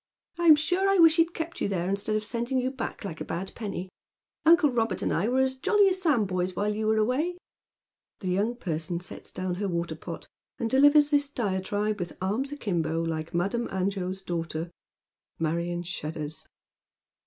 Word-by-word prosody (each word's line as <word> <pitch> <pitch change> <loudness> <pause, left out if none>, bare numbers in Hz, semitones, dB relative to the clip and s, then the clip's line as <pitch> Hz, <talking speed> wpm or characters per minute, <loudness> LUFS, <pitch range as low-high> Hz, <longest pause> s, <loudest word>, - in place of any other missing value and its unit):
I'm 335 -3 +8
sure 360 +6 +1
I 390 - +4
wish 330 -1 +7
he'd 335 +1 +3
kept 330 +1 -5
you - - +2
there 180 -3 -1
instead 200 +3 -1
of 215 - 0
sending 240 +4 -1
you 255 +1 -1
back, 255 -4 -5
like 165 -5 -6
a - - 0
bad 185 +3 -4
penny. 200 -4 -5 0.6
Uncle 325 -3 +6
Robert 225 -6 0
and - - 0
I 185 +6 +1
were 255 +2 +2
as 265 0 +2
jolly 400 +10 +3
as 375 0 -2
sandboys 195 - +1
wliileyou 210 +3 -1
were 220 0 +3
away." 270 +11 +1 0.8
The 185 - -3
young 205 +6 +1
person 170 -5 -3
sets 180 - -7
down 185 -1 -3
her 200 - 0
water 170 -2 -2
pot - - -8 0.3
and 230 -1 -2
delivers 290 +2 +6
this 285 -1 +3
diatribe 205 -2 -1
with 175 -1 -5
arms 220 +9 -1
akimbo, 170 - -1
like 160 -1 -3
Madame 200 +7 0
Angot's 190 0 -2
daughter. 165 -1 -3 0.7
Marion 170 +2 -1
shudders. 155 -3 -5
205 Hz, 175 wpm, -27 LUFS, 175-265 Hz, 0.8 s, I'm